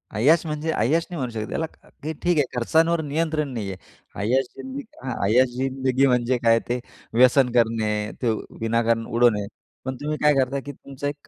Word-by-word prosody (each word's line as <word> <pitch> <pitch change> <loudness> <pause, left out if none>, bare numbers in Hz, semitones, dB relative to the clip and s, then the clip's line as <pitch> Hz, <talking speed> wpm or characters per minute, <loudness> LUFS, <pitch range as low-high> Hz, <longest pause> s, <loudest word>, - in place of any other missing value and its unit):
ऐयाश 155 +10 +4
म्हणजे 155 +1 -2
ऐयाश 155 +10 +1
नाही 175 - -5
म्हणू 125 -2 -2
शकत. 110 -1 -4
त्याला, 160 - -1 0.4
की 160 +1 -3
ठीक 175 -2 +2
आहे, 145 - +4
खर्चांवर 160 +7 +2
नियंत्रण 155 0 -1
नाही 105 -4 -3
आहे. 95 - -7 0.4
अयाश 130 +5 +2
जिंदगी 265 +2 -6 0.2
हं, 130 -2 -3
ऐयाश 125 +5 +4
जिंदगी 130 0 +1
म्हणजे 125 0 +2
काय? 115 0 +5
ते 125 +1 0 0.3
व्यसन 125 +1 +5
करणे, 110 -3 +1
ते 120 -3 +2 0.3
विनाकारण 115 0 +1
उडवणे. 115 -4 +2 0.4
पण 130 0 -3
तुम्ही 150 +1 -2
काय 150 - +6
करताय, 135 +1 +1
की 145 +2 -7
तुमचा 140 +1 -7
एक 145 0 -6
130 Hz, 180 wpm, -24 LUFS, 115-150 Hz, 0.4 s, काय